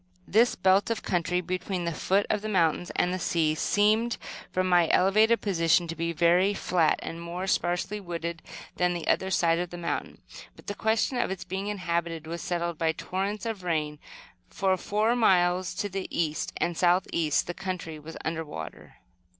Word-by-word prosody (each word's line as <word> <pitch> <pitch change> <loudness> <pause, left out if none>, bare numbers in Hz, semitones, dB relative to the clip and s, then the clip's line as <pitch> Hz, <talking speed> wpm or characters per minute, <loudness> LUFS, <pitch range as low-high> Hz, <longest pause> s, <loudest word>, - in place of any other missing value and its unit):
This 230 +4 +4
belt 190 +3 +3
of 230 - -2
country, 180 0 0
between 185 0 -3
the 170 - 0
foot 195 +6 +1
of 210 - 0
the 215 - -4
mountains 175 -3 +1
and 180 - +1
the 185 - -2
sea, 160 -3 +1
seemed, 215 +7 +2 0.3
from 185 0 0
my 175 -2 +4
elevated 215 +5 +4
position, 170 -3 +2
to 165 - -5
be 165 +1 -2
very 175 +5 +3
flat, 170 -5 +2
and 165 +1 -6
more 175 +2 -4
sparsely 185 +2 0
wooded 170 -2 -5 0.4
than 180 0 +2
the 170 - -4
other 190 - +2
side 170 -2 +2
of 175 0 -2
the 175 - -8
mountain; 170 -1 -4 0.4
but - - -17
the 205 - -3
question 220 +4 0
of - - +1
its 190 -1 -4
being 190 +2 -4
inhabited 170 -5 -2
was 170 +2 -5
settled 170 -2 -2
by 160 -1 +2
the - - -10
torrents 200 +4 -3
of 225 -4 -3
rain, 155 -4 -2 0.5
for, 190 -1 +1
for 210 +5 +1
miles 180 -5 +3
to 205 - -2
the 195 -1 -4
east 155 -2 -1
and 175 0 -1
south 180 +2 +3
east 155 -3 +1
the 175 - -4
country 180 -4 -5
was 160 +2 -9
under 160 0 -2
water. 150 - -9
180 Hz, 190 wpm, -27 LUFS, 170-195 Hz, 0.5 s, This